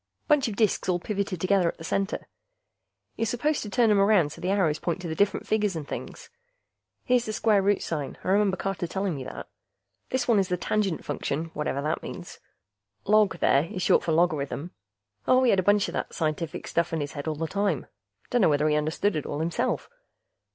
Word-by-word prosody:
Bunch 295 -4 +4
of 215 - -4
disks 210 -3 +1
all 180 - +3
pivoted 195 -1 -3
together 185 0 +2
at - - -3
the 165 - -10
center; 195 +4 -2 0.9
you're 225 - 0
supposed 260 +6 0
to 210 - -5
turn 225 +2 +3
'em 205 - +4
around 195 -7 +4
so - - -10
the 180 - -1
arrows 180 -6 +2
point 175 +1 -2
to 180 - -6
the 160 - -3
different 200 +4 +1
figures 210 -3 +1
and 155 -3 -5
things. - - -7 0.7
Here's 250 -2 +2
the 215 - -2
square 215 -2 +3
root 200 +1 +1
sign, 150 -4 -4
I - - -3
remember 195 -1 +3
Carter 190 -3 -3
telling 190 +1 -2
me 135 -3 -5
that. - - -7 0.6
This 260 -1 -1
one 230 -4 +4
is 190 - +1
the 180 -1 -1
Tangent 195 -2 -1
Function, 150 +2 -3
whatever 145 -2 -2
that 155 +2 -1
means. - - -8 0.7
Log, 205 -3 +4
there, 140 +3 +4
is 185 0 -5
short - - +4
for 165 - -1
logarithm. 155 -1 0 0.6
Oh, 255 0 +5
he 250 - +5
had 195 - +3
a - - +4
bunch 205 +2 +3
of - - -6
that - - -4
scientific 155 0 -2
stuff 170 0 0
in 165 - 0
his 145 -1 -3
head 145 +1 -6
all 155 - -1
the 165 +2 -2
time; 200 -4 -1 0.5
dunno 240 -8 +4
whether 150 +1 +2
he 150 - +2
understood 155 +6 0
it 150 - -3
all 145 - -3
himself. 165 +2 -1
185 Hz, 215 wpm, -26 LUFS, 160-205 Hz, 0.9 s, Oh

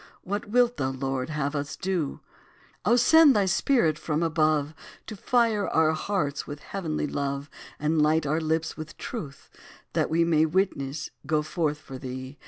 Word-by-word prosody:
What 205 +3 -3
wilt 245 +1 +3
thou, 130 - 0
Lord, 135 +1 -3
have 150 -1 -2
us 145 -1 -3
to - - -28
do? 175 -7 -1 0.7
O 235 - +5
send 290 +4 +6
thy 205 -2 +3
Spirit 190 - +2
from 155 +1 -1
above 155 -2 +1 0.3
To 215 - -7
fire 225 -1 +1
our 160 -1 +3
hearts 155 -3 -2
with 145 0 -6
heavenly 165 -7 -3
love; 140 0 -3 0.3
And 155 +1 +1
light 155 +1 +3
our 155 +3 0
lips 160 0 -1
with 155 -1 -9
truth, 150 - -7 0.4
that - - +1
we 165 +1 +3
May, 160 -1 +3
witnesses, 150 -5 -1 0.2
go 155 -1 +1
forth 155 -2 -1
for 135 -4 -10
thee. 130 +2 -7
155 Hz, 170 wpm, -26 LUFS, 145-190 Hz, 0.7 s, send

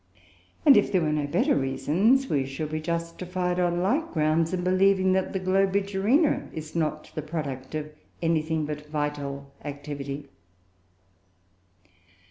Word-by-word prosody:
And 285 -3 +9
if 205 - +3
there 185 -3 +3
were 155 - +1
no 150 -1 0
better - - +2
reasons, 165 - +2
we 140 - +1
should 150 +3 -4
be 155 0 -2
justified, 175 +2 -2
on 175 0 +1
like 290 - 0
grounds, 160 +1 +2
in 180 -1 -2
believing 190 +1 +3
that 190 0 0
Globigerina 195 - +1
is 155 0 -8
not 155 -2 -2
the 155 - -3
product 145 -3 -5
of 150 0 -4 0.3
anything 160 -1 0
but 150 0 -6
vital 145 -2 -3
activity. 145 -1 -6
160 Hz, 130 wpm, -26 LUFS, 150-185 Hz, 0.3 s, And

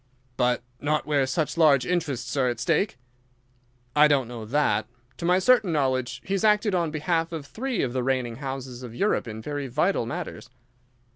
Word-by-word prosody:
"But 125 -1 +1 0.2
not 150 +1 0
where 140 -3 +1
such 150 +5 -1
large 145 -5 +5
interests 145 -8 -2
are 130 -3 +2
at 120 -2 -3
stake?" 160 - +1 1.0
"I 150 +1 +7
don't 140 -4 +2
know 115 -2 -7
that. 110 -4 +1 0.3
To 170 - -5
my 180 +1 +4
certain 215 -1 +4
knowledge 130 -4 0
he 195 - -2
has 195 - 0
acted 210 -1 +3
on 170 -3 +1
behalf 165 +2 -1
of 160 -4 -5
three 245 - -2
of 125 -3 -2
the 130 - 0
reigning 125 -2 -1
houses 130 -2 -6
of 120 -2 -8
Europe 200 - +1
in 110 0 -7
very 145 0 -3
vital 150 0 +1
matters." 115 -1 -6
140 Hz, 185 wpm, -26 LUFS, 125-170 Hz, 1.0 s, I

